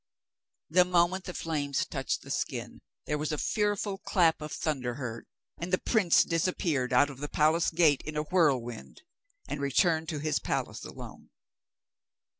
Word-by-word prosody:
The 180 +2 +6
moment 180 +1 +1
the 180 - -5
flames 145 -4 -1
touched - - -3
the - - -8
skin - - -3 0.2
there 150 0 -1
was 150 +1 -2
a 150 - -1
fearful 205 +1 -1
clap 170 -6 +2
of 150 - -6
thunder 130 -6 -2
heard, 120 -4 -6 0.3
and 175 +2 -5
the 185 - +4
prince 200 -7 +3
disappeared 165 -6 0
out 145 +3 +4
of 135 - -12
the 145 0 -4
palace 160 +2 +3
gate 160 -4 +3
in 155 0 -5
a 150 - 0
whirlwind, 145 - 0 0.4
and 145 - -4
returned 160 +3 +2
to 155 - -3
his 150 -1 0
palace - - -3
alone. - - -10
155 Hz, 160 wpm, -29 LUFS, 145-175 Hz, 0.4 s, The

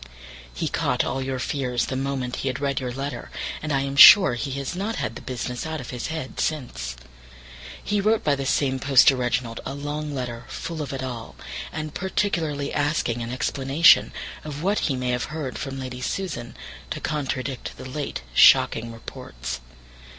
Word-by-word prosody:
He - - -3
caught - - 0
all 135 - -2
your 130 0 -2
fears 125 -2 -1
the 130 - -4
moment 130 -2 -2
he - - -3
had 130 -1 -1
read 140 -1 0
your 125 -2 -3
letter, 135 -1 -5 0.3
and 155 - -3
I 135 -1 +2
am 135 0 -3
sure 190 +1 +10
he 120 +4 -3
has 140 +4 -4
not 205 +5 -2
had 110 - -2
the - - -8
business 125 -1 -4
out 160 -1 -4
of 125 - -7
his 125 -2 -4
head 160 -5 -5
since. 90 - -2 0.9
He 205 0 0
wrote 215 +2 +2
by 145 -1 +3
the 135 -1 -3
same 135 -1 +1
post 135 -2 +5
to 135 - +3
Reginald 125 -2 -1
a 135 - -5
long 145 +1 -4
letter 120 -2 -4
full 165 -2 -5
of 145 - -4
it 135 -1 -4
all, 120 -3 -6 0.4
and 155 -1 -5
particularly 165 -7 -1
asking 145 -5 0
an 115 +1 -4
explanation 135 +5 +4 0.3
of 150 0 -6
what 200 +3 +2
he 135 - +1
may 125 -1 -2
have 125 0 -1
heard 155 -4 -5
from 135 0 -4
Lady 125 -1 -6
Susan 130 -7 -4 0.3
to - - -3
contradict 135 -3 -3
the - - -9
late 140 - -4
shocking 115 - +6
reports. 65 - -7
135 Hz, 185 wpm, -24 LUFS, 125-150 Hz, 0.9 s, sure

